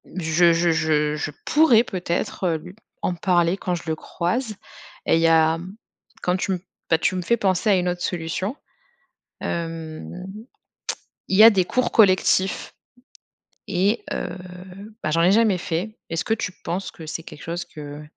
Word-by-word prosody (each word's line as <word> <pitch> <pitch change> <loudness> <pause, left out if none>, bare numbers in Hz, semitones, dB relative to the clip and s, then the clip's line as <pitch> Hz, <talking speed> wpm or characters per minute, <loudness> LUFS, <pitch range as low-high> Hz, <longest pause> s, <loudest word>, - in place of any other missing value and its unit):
Je 170 -1 +3
je 170 +1 +2
je 155 -2 +1
je 150 - -3
pourrais 280 -7 +5
peut-être 180 -2 -2
lu 180 +1 -11 0.3
en - - +1
parler 175 0 +2
quand 180 -2 -2
je 170 - -7
le 160 - 0
croise. 215 +8 -2 0.5
Et - - +4
il 165 - +2
y 165 - +5
a 160 0 +4 0.6
quand 180 - +2
tu 190 - -2
me 180 - -2 0.3
bah, 160 - +5
tu 185 - +1
me 180 - -1
fais 235 +6 +2
penser 190 +1 +1
à 200 - +6
une 180 0 0
autre 175 0 -3
solution. 180 - -2 0.9
Hem. 165 -2 -4 1.2
Il 190 - +2
y 215 - +9
a 225 - +12
des 190 -3 +3
cours 255 +6 0
collectifs 190 -2 +3 0.9
et 200 +4 +1
heu, - - -3 0.7
bah, 155 - -1
j'en 165 - +2
ai 180 +3 +5
jamais 215 -3 +4
fait. 180 +6 -3
Est-ce 165 +1 -1
que 220 - +1
tu 195 -4 -4
penses 185 +3 -3
que 165 - -11
c'est 165 - -5
quelque 145 - -11
chose 170 +1 -3
que 145 0 -9
175 Hz, 170 wpm, -23 LUFS, 165-195 Hz, 1.2 s, a